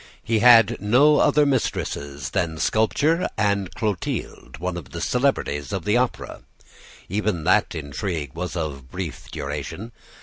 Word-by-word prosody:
He 115 Hz, -1 st, +1 dB
had 120 Hz, -1 st, +6 dB
no 135 Hz, +9 st, +5 dB
other 150 Hz, 0 st, +4 dB
mistresses 70 Hz, -, -2 dB
than 85 Hz, -5 st, -1 dB
sculpture 145 Hz, -, +1 dB
and 100 Hz, -3 st, 0 dB
Clotilde, 95 Hz, -, -4 dB
one 90 Hz, +3 st, -3 dB
of 85 Hz, -7 st, -9 dB
the -, -, -5 dB
celebrities 120 Hz, -, 0 dB
of 95 Hz, -5 st, -3 dB
the 105 Hz, -, +2 dB
Opera. 125 Hz, 0 st, -1 dB, 0.7 s
Even 100 Hz, -3 st, -1 dB
that -, -, +2 dB
intrigue 75 Hz, -1 st, -4 dB
was 90 Hz, +2 st, -5 dB
of 70 Hz, -6 st, -4 dB
brief 90 Hz, -2 st, -6 dB
duration. 75 Hz, +9 st, -5 dB
95 Hz, 135 wpm, -23 LUFS, 75-115 Hz, 0.7 s, had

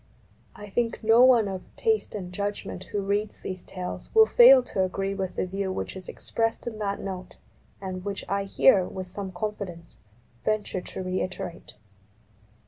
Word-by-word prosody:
I 205 Hz, -, -9 dB
think 230 Hz, +3 st, -1 dB
no 225 Hz, +3 st, +6 dB
one 245 Hz, -5 st, +6 dB
of 190 Hz, -1 st, -4 dB
taste 445 Hz, -, 0 dB
and 180 Hz, -3 st, -6 dB
judgment 200 Hz, -1 st, -4 dB
who 205 Hz, 0 st, -3 dB
reads 205 Hz, +2 st, -1 dB
these 185 Hz, -1 st, -5 dB
Tales 180 Hz, -1 st, -6 dB
will 445 Hz, 0 st, +9 dB
fail 355 Hz, -, +8 dB
to 195 Hz, -5 st, -1 dB
agree 195 Hz, +1 st, -2 dB
with 190 Hz, -2 st, -3 dB
the -, -, 0 dB
view 190 Hz, +1 st, -3 dB
which 185 Hz, -, -4 dB
is 185 Hz, -1 st, -9 dB
expressed 225 Hz, 0 st, -2 dB
in 225 Hz, -3 st, -5 dB
that 200 Hz, -1 st, -2 dB
Note 185 Hz, -2 st, -6 dB, 0.4 s
and 185 Hz, -1 st, -5 dB
which 200 Hz, 0 st, -4 dB
I 200 Hz, 0 st, -1 dB
here, 195 Hz, -1 st, +5 dB
with 185 Hz, 0 st, -6 dB
some 190 Hz, +1 st, -6 dB
confidence, 185 Hz, -4 st, -6 dB, 0.5 s
venture 215 Hz, -3 st, -1 dB
to 185 Hz, -, -7 dB
reiterate. 185 Hz, -1 st, -4 dB
195 Hz, 165 wpm, -27 LUFS, 185-215 Hz, 0.5 s, will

